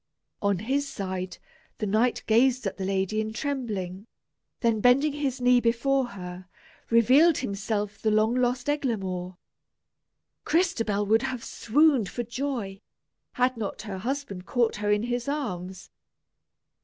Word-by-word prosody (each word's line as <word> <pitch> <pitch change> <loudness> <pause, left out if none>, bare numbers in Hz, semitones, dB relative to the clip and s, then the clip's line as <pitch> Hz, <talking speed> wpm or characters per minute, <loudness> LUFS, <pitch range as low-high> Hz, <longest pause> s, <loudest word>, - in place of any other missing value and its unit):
On 200 -2 +2
his 270 +8 -1
side, 185 -4 -4 0.4
the 215 - -2
knight 220 +4 +1
gazed 250 +2 +3
at 195 - -3
the 190 - -3
lady 195 +2 0
in 220 0 -4
trembling, 220 - -4 0.5
then 230 -3 +2
bending 275 +5 +4
his 280 -3 -2
knee 250 0 +5
before 255 +3 +2
her, 180 0 -8 0.4
revealed 265 +8 +5
himself 205 -2 -3
the 220 - +2
long 215 +2 +3
lost 250 0 0
Eglamour. 190 -11 -2 1.1
Crystabell 225 - +1
would 220 +2 +3
have 250 -3 -3
swooned 270 -3 +2
for 240 - -3
joy, 235 -5 -4 0.5
had 250 0 +1
not 210 -2 -4
her 200 -3 -5
husband 230 -5 -4
caught 235 -3 +1
her 205 0 0
in 210 +1 +2
his 245 +1 -2
arms. 190 -11 -4
230 Hz, 135 wpm, -27 LUFS, 200-255 Hz, 1.1 s, knee